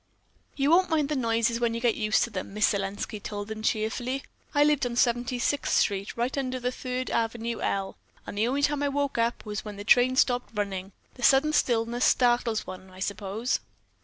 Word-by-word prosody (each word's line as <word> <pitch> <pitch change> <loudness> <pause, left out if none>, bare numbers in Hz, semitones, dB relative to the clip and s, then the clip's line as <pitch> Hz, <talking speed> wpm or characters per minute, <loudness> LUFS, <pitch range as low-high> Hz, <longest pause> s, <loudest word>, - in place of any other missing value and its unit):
"You 280 +2 +2
won't 370 +2 +5
mind 305 -3 +1
the 300 - 0
noises 230 -2 +1
when 235 -1 0
you - - -2
get 235 -1 +2
used 215 0 +2
to 235 - -4
them," 195 0 -6
Miss 215 - +4
Selenski 200 +1 -3
told 205 +1 -5
them 220 0 -5
cheerfully. 240 +5 -1 0.3
"I 290 - +6
lived 295 -2 +3
on 240 - -5
Seventy 245 0 +1
sixth 280 +4 0
Street, 200 +1 0
right 240 +2 -1
under 255 -1 -2
the 250 0 -1
Third 255 0 -4
Avenue 230 0 -1
L, 195 -1 -2 0.3
and - - -7
the 215 +3 +1
only 275 +3 0
time 290 0 +1
I 285 - +1
woke 280 -3 -1
up 230 +1 0
was 210 0 -4
when 210 -1 -7
the 205 - -6
trains 255 +4 +5
stopped 245 -1 0
running. 195 -2 -3 0.2
The 250 - -13
sudden 275 +5 +4
stillness 240 -2 +1
startles 240 -3 +2
one, 185 0 -9
I 185 0 -14
suppose." 200 +5 -2
235 Hz, 205 wpm, -27 LUFS, 210-255 Hz, 0.3 s, I